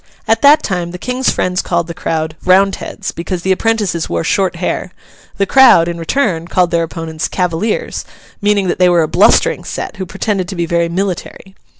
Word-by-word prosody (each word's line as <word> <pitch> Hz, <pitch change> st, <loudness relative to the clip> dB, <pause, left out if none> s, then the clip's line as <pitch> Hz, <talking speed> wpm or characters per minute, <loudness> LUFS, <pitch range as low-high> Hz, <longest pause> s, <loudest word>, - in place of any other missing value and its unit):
At 225 Hz, 0 st, +2 dB
that 290 Hz, +2 st, +6 dB
time 180 Hz, -3 st, -2 dB
the 180 Hz, -, -7 dB
King's 250 Hz, +6 st, -1 dB
friends 180 Hz, +1 st, 0 dB
called 170 Hz, -1 st, -1 dB
the 170 Hz, -, -7 dB
crowd, 160 Hz, -1 st, -3 dB
Roundheads, 195 Hz, +2 st, +1 dB
because 170 Hz, +1 st, -5 dB
the 190 Hz, -, +1 dB
apprentices 205 Hz, -4 st, 0 dB
wore 85 Hz, -1 st, -1 dB
short 190 Hz, -3 st, 0 dB
hair; 180 Hz, +1 st, -3 dB, 0.5 s
the 200 Hz, -, +1 dB
crowd, 240 Hz, -9 st, +6 dB
in 170 Hz, -1 st, -4 dB
return, 170 Hz, -, -1 dB
called 180 Hz, -1 st, +1 dB
their 170 Hz, -, +1 dB
opponents 165 Hz, -1 st, -4 dB
Cavaliers, 180 Hz, +4 st, -2 dB, 0.4 s
meaning 205 Hz, -2 st, +1 dB
that 175 Hz, -, -2 dB
they 180 Hz, -1 st, +5 dB
were 175 Hz, -2 st, +3 dB
a -, -, -1 dB
blustering 175 Hz, +5 st, +3 dB
set, -, -, -6 dB
who 190 Hz, -1 st, -5 dB
pretended 195 Hz, -1 st, -2 dB
to 190 Hz, -, -6 dB
be 170 Hz, -1 st, -1 dB
very 170 Hz, 0 st, 0 dB
military. 190 Hz, +1 st, -4 dB
180 Hz, 190 wpm, -15 LUFS, 170-200 Hz, 0.5 s, that